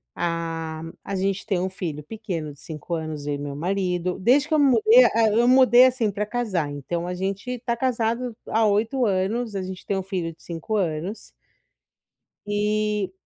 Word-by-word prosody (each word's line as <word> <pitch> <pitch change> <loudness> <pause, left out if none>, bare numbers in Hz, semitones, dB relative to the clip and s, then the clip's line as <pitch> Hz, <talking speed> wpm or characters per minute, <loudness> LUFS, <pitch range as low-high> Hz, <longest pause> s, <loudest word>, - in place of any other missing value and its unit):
a 165 -2 -3 0.2
a 200 - -4
gente 195 +1 -1
tem 195 -5 0
um 185 +1 -1
filho 160 -5 -5
pequeno 165 -5 -5
de 140 - -21
5 160 +2 -5
anos, 155 -3 -5
eu 145 - 0
e - - -4
meu 140 0 -5
marido. 180 +1 -1
Desde 260 - +3
que 315 - -2
eu 310 - +4
mudei, 435 - +6
ah, 225 -1 +3
eu 235 +3 +3
mudei, 255 -1 +7
assim, 250 -4 +2
pra 205 +1 -2
casar, 205 -10 -2
então 170 +5 -4
a 180 - -3
gente 195 +7 -3
tá 235 0 -2
casado 235 -1 -1
há 225 0 +2
8 220 +5 +1
anos, 205 +3 -1
a 195 - -1
gente 185 0 -7
tem 200 - -1
um 190 - -2
filho 180 -4 -3
de - - -27
5 170 +6 -4
anos 180 +1 -2 1.1
e 210 -1 0
195 Hz, 185 wpm, -24 LUFS, 170-230 Hz, 1.1 s, mudei